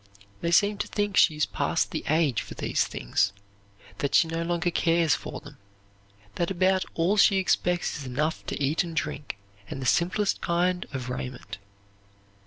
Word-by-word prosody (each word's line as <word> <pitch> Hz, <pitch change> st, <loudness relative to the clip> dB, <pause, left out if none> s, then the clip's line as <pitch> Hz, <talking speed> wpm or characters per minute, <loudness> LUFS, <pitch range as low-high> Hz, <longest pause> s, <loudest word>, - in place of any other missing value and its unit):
They 170 Hz, -, 0 dB
seem 205 Hz, +3 st, +3 dB
to -, -, -2 dB
think 205 Hz, -2 st, -2 dB
she 155 Hz, -, +5 dB
is 150 Hz, -, +1 dB
past -, -, -1 dB
the -, -, -3 dB
age 150 Hz, -, +2 dB
for -, -, -9 dB
these -, -, 0 dB
things, 100 Hz, +11 st, 0 dB, 0.7 s
that 140 Hz, -, 0 dB
she 165 Hz, -, +5 dB
no 165 Hz, +1 st, -3 dB
longer 175 Hz, +1 st, 0 dB
cares 165 Hz, -2 st, +2 dB
for -, -, -4 dB
them, 145 Hz, -2 st, -14 dB, 0.8 s
that 170 Hz, -, 0 dB
about 190 Hz, 0 st, +2 dB
all 175 Hz, +5 st, +2 dB
she 195 Hz, -1 st, +5 dB
expects 180 Hz, -1 st, 0 dB
is 140 Hz, -, -7 dB
enough 150 Hz, +6 st, -1 dB
to -, -, -3 dB
eat 145 Hz, +4 st, +1 dB
and 170 Hz, -2 st, -7 dB
drink, 150 Hz, -7 st, -3 dB, 0.3 s
and -, -, -5 dB
the 130 Hz, -, -5 dB
simplest 185 Hz, -, +1 dB
kind 180 Hz, +1 st, 0 dB
of 130 Hz, -2 st, -5 dB
raiment. 125 Hz, -3 st, -6 dB
170 Hz, 175 wpm, -26 LUFS, 145-180 Hz, 0.8 s, she